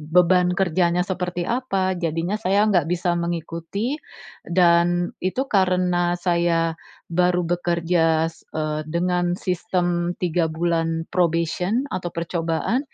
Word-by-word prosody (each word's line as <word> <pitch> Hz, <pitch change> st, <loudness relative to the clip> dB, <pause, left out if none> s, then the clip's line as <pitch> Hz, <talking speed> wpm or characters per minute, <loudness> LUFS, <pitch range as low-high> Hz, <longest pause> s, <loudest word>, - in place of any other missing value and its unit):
beban 180 Hz, +3 st, +3 dB
kerjanya 175 Hz, -1 st, +2 dB
seperti 180 Hz, -2 st, -3 dB
apa, 195 Hz, -5 st, 0 dB
jadinya 170 Hz, +5 st, -2 dB
saya 200 Hz, +1 st, +3 dB
nggak 175 Hz, -6 st, +2 dB
bisa 175 Hz, 0 st, 0 dB
mengikuti 170 Hz, -, -3 dB, 0.5 s
dan 175 Hz, 0 st, +3 dB
itu 190 Hz, +9 st, -1 dB
karena 180 Hz, -2 st, +2 dB
saya 170 Hz, -2 st, +1 dB, 0.4 s
baru 180 Hz, +1 st, +2 dB
bekerja, 170 Hz, -1 st, +1 dB, 0.2 s
eee, 155 Hz, 0 st, -1 dB
dengan 175 Hz, +1 st, 0 dB
sistem 175 Hz, -2 st, -1 dB
3 170 Hz, -1 st, +1 dB
bulan 165 Hz, 0 st, -1 dB
probation 180 Hz, -, +1 dB
atau 180 Hz, -1 st, -3 dB
percobaan. 170 Hz, +7 st, -1 dB
175 Hz, 105 wpm, -22 LUFS, 170-180 Hz, 0.5 s, beban